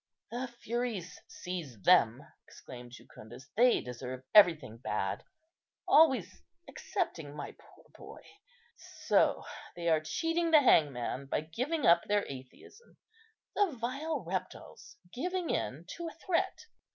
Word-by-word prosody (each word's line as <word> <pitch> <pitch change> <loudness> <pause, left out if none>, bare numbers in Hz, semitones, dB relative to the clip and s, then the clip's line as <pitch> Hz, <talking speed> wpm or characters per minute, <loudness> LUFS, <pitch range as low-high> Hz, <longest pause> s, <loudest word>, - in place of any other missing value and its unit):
"The 245 +2 -3
Furies 235 -6 -4
seize 165 - -7
them!" - - +4 0.2
exclaimed 125 -1 -11
Jucundus: 130 +2 -13
"they 245 +2 +4
deserve 125 +1 -7
everything 160 - +5
bad, 120 - -3 0.6
always 265 - +4 0.3
excepting 145 -2 -4
my - - -6
poor - - -21
boy. - - -12 0.8
So - - +3 0.3
they 170 -1 -1
are 160 -1 +3
cheating 330 - -1
the 310 -2 +7
hangman 140 - +2
by 140 - -1
giving 255 - -2
up 170 0 +5
their 205 0 +1
atheism, 135 - -12 0.6
the 400 -6 +2
vile 275 +3 -3
reptiles, 185 +1 -6 0.2
giving 360 +6 -2
in 150 +7 -3
to 340 -1 -5
a 325 - -8
threat. 360 +4 -1
185 Hz, 120 wpm, -31 LUFS, -, 0.8 s, the